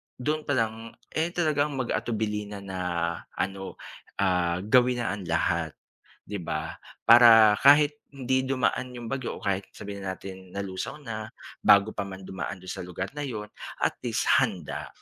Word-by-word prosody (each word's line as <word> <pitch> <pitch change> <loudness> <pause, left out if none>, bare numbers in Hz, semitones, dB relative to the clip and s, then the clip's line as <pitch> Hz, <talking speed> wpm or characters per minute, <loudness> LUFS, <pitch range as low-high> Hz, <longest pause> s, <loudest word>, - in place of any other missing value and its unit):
do'n 150 +4 -2
palang, 115 -4 -1 0.2
eh, 160 +1 0
talagang 150 -4 +1
mag-atubili 110 -4 -2
na 100 -1 -8
na 95 -1 -6 0.6
ano 95 0 -3 0.4
ah, 90 -2 +1
gawin 125 +2 +3
na - - -1
ang 100 -3 -5
lahat 80 -1 0 0.5
'di 105 0 -5
ba, 80 0 -3 0.3
para 115 -2 +9
kahit 145 +1 +6 0.2
hindi 130 0 0
dumaan 130 -1 0
'yong 120 -2 -7
bagyo 130 -2 -3
o - - -12
kahit 100 -1 -1
sabihin 100 0 -7
nanatin 95 0 -7
nalusaw 100 +2 -4
na 110 -3 -5 0.3
bago 105 +1 +5
pa 100 -2 -4
man 95 0 -9
dumaan 95 +1 -5
do'n 95 - -6
sa - - -5
lugar 90 +2 -5
na 150 - -6
'yon 105 -4 -5 0.4
at - - +2
least - - 0 0.2
handa. - - -2
105 Hz, 155 wpm, -27 LUFS, 95-125 Hz, 0.6 s, para